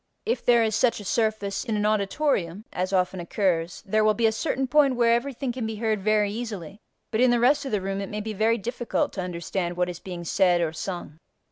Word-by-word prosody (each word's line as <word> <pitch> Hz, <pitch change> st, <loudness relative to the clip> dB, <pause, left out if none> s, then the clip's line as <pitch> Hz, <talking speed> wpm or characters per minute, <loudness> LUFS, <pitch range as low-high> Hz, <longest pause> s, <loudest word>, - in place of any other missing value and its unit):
If 470 Hz, -, -1 dB
there 235 Hz, -1 st, +5 dB
is 220 Hz, -1 st, 0 dB
such 235 Hz, 0 st, +2 dB
a -, -, -8 dB
surface 215 Hz, -2 st, 0 dB
in 225 Hz, -4 st, -2 dB
an 210 Hz, -, 0 dB
auditorium 205 Hz, -, 0 dB
(as 185 Hz, +1 st, -2 dB
often 185 Hz, -1 st, +1 dB
occurs) 175 Hz, -1 st, -1 dB
there 215 Hz, +2 st, +2 dB
will 215 Hz, 0 st, +3 dB
be 230 Hz, -, +1 dB
a 220 Hz, -, +5 dB
certain 265 Hz, +4 st, -1 dB
point 275 Hz, 0 st, +3 dB
where 235 Hz, -1 st, +4 dB
everything 255 Hz, +1 st, -1 dB
can 240 Hz, -2 st, -3 dB
be 220 Hz, -, -4 dB
heard 215 Hz, -1 st, -1 dB
very 210 Hz, 0 st, +2 dB
easily, 205 Hz, -5 st, -6 dB, 0.3 s
but 225 Hz, +1 st, +1 dB
in 255 Hz, -, +5 dB
the 240 Hz, 0 st, +3 dB
rest 280 Hz, +4 st, +3 dB
of 270 Hz, -, -4 dB
the 210 Hz, -2 st, 0 dB
room 195 Hz, +1 st, -3 dB
it 195 Hz, -, -5 dB
may 210 Hz, 0 st, -4 dB
be 220 Hz, +1 st, -4 dB
very 220 Hz, +3 st, +2 dB
difficult 240 Hz, +2 st, -2 dB
to 190 Hz, -, -3 dB
understand 175 Hz, 0 st, -3 dB
what 180 Hz, 0 st, +1 dB
is 175 Hz, -1 st, -6 dB
being 175 Hz, -2 st, -7 dB
said 180 Hz, +1 st, +3 dB
or 165 Hz, -2 st, 0 dB
sung. 165 Hz, -2 st, -6 dB
215 Hz, 235 wpm, -25 LUFS, 185-235 Hz, 0.3 s, there